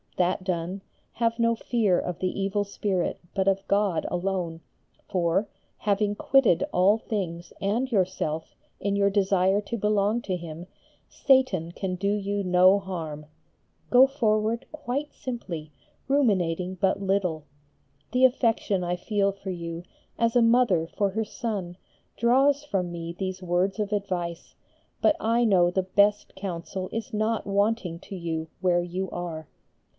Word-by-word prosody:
That 180 +1 +1
done, 180 +1 -3 0.3
have 230 0 0
no 230 0 +3
fear 220 -5 +1
of 180 -1 -4
the 185 +1 -2
evil 200 +1 0
spirit 200 -2 -2
but 190 -1 0
of 195 0 +1
God 200 -4 +1
alone, 175 -2 -2 0.5
for, 180 +2 +1 0.3
having 205 0 +1
quitted 265 -7 +3
all 190 +4 +4
things 180 -6 -4
and 230 +7 0
yourself 180 -6 -1 0.2
in 200 0 -1
your 200 0 +3
desire 195 0 +2
to 235 +3 -4
belong 210 +2 +1
to 185 - -2
Him, 170 0 -8 0.4
Satan 255 - +2
can 185 +1 -3
do 195 +2 -2
you 205 0 -1
no 185 +2 +5
harm. 160 -6 -6 0.6
Go 255 +1 +8
forward 225 -3 0
quite 295 -1 -3
simply, 175 - -6 0.4
ruminating 185 - +1
but 190 +2 +1
little. 185 -6 0 0.7
The 255 +1 +5
affection 225 -7 +1
I 175 0 -1
feel 200 +2 0
for 195 -1 -7
you, 170 -1 -5 0.4
as 230 0 +2
a 245 - +6
mother 230 -8 +4
for 200 +3 -1
her 220 +2 -1
son, 200 -6 -4 0.4
draws 270 +5 +3
from 190 -11 -2
me 170 0 -5
these 190 -1 -4
words 180 +3 0
of 210 -1 -1
advice, 180 -5 -3 0.4
but 305 - +4
I 230 +2 +2
know 180 -5 +4
the 185 +1 0
best 200 +2 +2
counsel 185 0 -5
is 225 +1 -5
not 215 +1 0
wanting 200 -3 0
to 195 - -8
you 165 -2 -3
where 175 -2 +3
you 180 +2 -3
are. 165 -3 -5
195 Hz, 145 wpm, -26 LUFS, 175-215 Hz, 0.7 s, Go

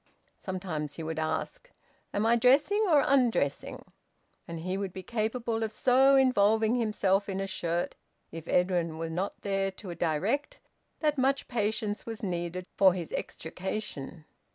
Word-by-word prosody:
Sometimes 175 -6 -4
he 165 - -6
would 160 0 -3
ask, 160 - -3 0.4
"Am 205 +2 0
I 230 +1 +5
dressing 285 - +4
or 295 -4 +5
undressing?" 240 - +1 0.6
And 165 -1 -6
he 185 +2 -2
would 195 -1 -3
be 190 - -7
capable 225 +1 -2
of 220 -1 -1
so 265 +4 +4
involving 220 -4 +4
himself 210 -4 +1
in 195 0 -2
a 195 - -1
shirt, 175 -2 -2 0.4
if 165 0 -8
Edwin 175 -3 +1
were 165 0 -4
not 185 +4 -3
there 195 -1 0
to 190 -2 -7
direct, 175 - -1 0.4
that 300 -3 +1
much 270 +1 +1
patience 215 -2 -1
was 225 -1 -6
needed 175 -1 -3
for 190 -2 +5
his 170 -3 -5
extrication. 165 -3 -5
195 Hz, 150 wpm, -29 LUFS, 175-230 Hz, 0.6 s, I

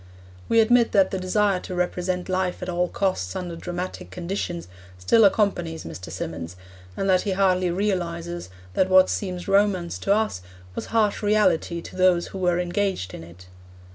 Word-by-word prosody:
We 230 - +5
admit 235 +1 +3
that 195 -2 +4
the 190 - -2
desire 190 +1 +1
to 180 - -7
represent 180 0 -1
life 185 -1 -1
at 180 - -4
all 180 0 0
costs 185 - -1
under 175 -2 -4
dramatic 175 +2 -5
conditions 175 -1 -4 0.3
still 90 - +4
accompanies 185 -6 +1
Mr. 90 +3 -8
Symonds, 85 +1 -5 0.4
and 195 - -1
that 185 -1 +4
he 200 - -1
hardly 185 -1 +2
realises 175 - -2 0.2
that 185 - +2
what 185 0 +6
seems 180 -3 -3
romance 195 -3 +2
to 195 - -1
us 215 - -1 0.3
was - - -5
harsh 215 -3 +1
reality 205 -5 +2
to - - -10
those 185 -2 +3
who 190 - -7
were 175 -1 +2
engaged 180 - -1
in - - -8
it. 85 +2 -14
185 Hz, 170 wpm, -24 LUFS, 170-195 Hz, 0.4 s, what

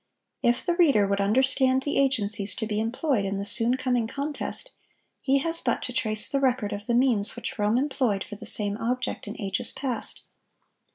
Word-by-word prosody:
If 240 0 0
the 345 -2 0
reader 280 - +4
would 200 0 -1
understand 260 +4 +2
the 285 - -1
agencies 210 -7 +1
to 240 - -3
be 210 -1 -3
employed 235 +1 -1
in 195 0 -3
the 200 - -4
soon 235 +3 +1
coming 245 -3 -1
contest, 285 +5 -3 0.5
he 275 0 +2
has 330 +4 +7
but 240 - -1
to 250 - -5
trace 215 -4 +3
the 275 - -1
record 255 -6 0
of 205 +1 -8
the 235 - 0
means 240 -5 +1
which - - -6
Rome 210 +3 +1
employed 255 -7 -1
for 210 - -10
the - - -8
same 205 -1 -1
object 250 0 -3
in 210 - -8
ages 200 +4 -1
past. 255 -5 -2
240 Hz, 190 wpm, -25 LUFS, 210-265 Hz, 0.5 s, has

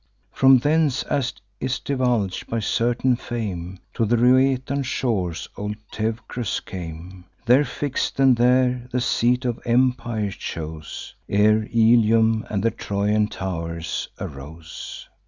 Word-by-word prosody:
From 135 0 +6
thence, 150 +1 +2
as 130 -3 -1 0.3
'tis 130 0 -1
divulg'd 125 -8 -1
by 115 - -2
certain 120 +3 +1
fame, 95 -7 -5 0.2
To - - 0
the 115 +2 +2
Rhoetean 130 +3 +3
shores 110 - -2
old 105 +1 -4 0.2
Teucrus 115 +1 -3
came; 90 +1 -8 0.2
There 125 +5 +5
fix'd, 145 -1 -3
and 135 -2 +6
there 125 0 +2
the 125 - 0
seat 125 +1 +1
of 120 -2 -1
empire 120 -4 +1
chose, 80 -3 -7 0.2
Ere 105 +2 +3
Ilium 115 -1 +4
and 100 -2 -1
the 115 - +3
Trojan 105 +1 0
tow'rs 85 -4 -4
arose. 80 +4 -8
115 Hz, 120 wpm, -23 LUFS, 100-125 Hz, 0.3 s, From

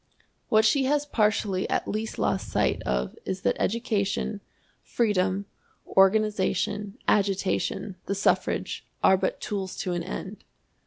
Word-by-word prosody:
What 220 0 +5
she 265 +5 +3
has 290 +2 +1
partially 210 -6 +1
at - - 0
least 215 +1 -3
lost - - 0
sight - - +1
of 65 0 -1
is 190 0 -4
that - - +1
education, 205 -2 -1 0.4
freedom, 200 -3 0 0.5
organization, 205 +1 +2
agitation, 195 -1 0
the 200 - 0
suffrage, 200 - 0 0.2
are 190 - +7
but 190 - -1
tools 195 -3 -4
to 180 - -2
an 175 - -1
end. 190 +3 -6
200 Hz, 125 wpm, -26 LUFS, 190-215 Hz, 0.5 s, are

